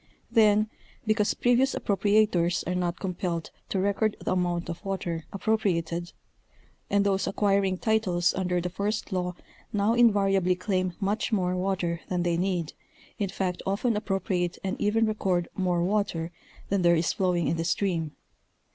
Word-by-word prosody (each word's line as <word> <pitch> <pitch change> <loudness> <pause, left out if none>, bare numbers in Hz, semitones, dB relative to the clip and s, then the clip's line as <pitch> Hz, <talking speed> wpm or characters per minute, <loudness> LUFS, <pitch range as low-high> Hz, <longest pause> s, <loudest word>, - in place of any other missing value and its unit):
Then, 215 -1 +4 0.4
because 215 -1 +2
previous 245 +2 +3
appropriators 200 -3 +2
are 180 - 0
not 180 -1 -1
compelled 175 -3 -3 0.2
to - - -1
record 200 +2 +1
the - - -3
amount 175 -1 0
of 170 0 -6
water 175 -4 -3
appropriated, 175 -5 -1 0.8
and 200 0 +2
those 195 -1 +1
acquiring 195 -2 +1
titles 185 -5 +1
under 180 -1 0
the 180 +1 -3
first 205 +4 -2
law 180 -1 -1 0.4
now 205 +2 +2
invariably 195 -6 +4
claim 185 -1 -1
much 205 +3 -1
more 185 -4 +1
water 180 -3 -1
than 180 -1 0
they 175 -1 +1
need, 175 -2 -1 0.5
in 200 -2 0
fact 185 -2 -2
often 210 +4 0
appropriate 190 -4 -1
and 190 - -1
even 225 +2 +3
record 190 -5 0
more 180 -2 +1
water 180 -4 -1 0.4
than 200 -1 +1
there 170 -1 +5
is 165 +1 +1
flowing 180 -3 +1
in 165 - 0
the 165 - -1
stream. 165 -3 -1
190 Hz, 150 wpm, -27 LUFS, 175-205 Hz, 0.8 s, there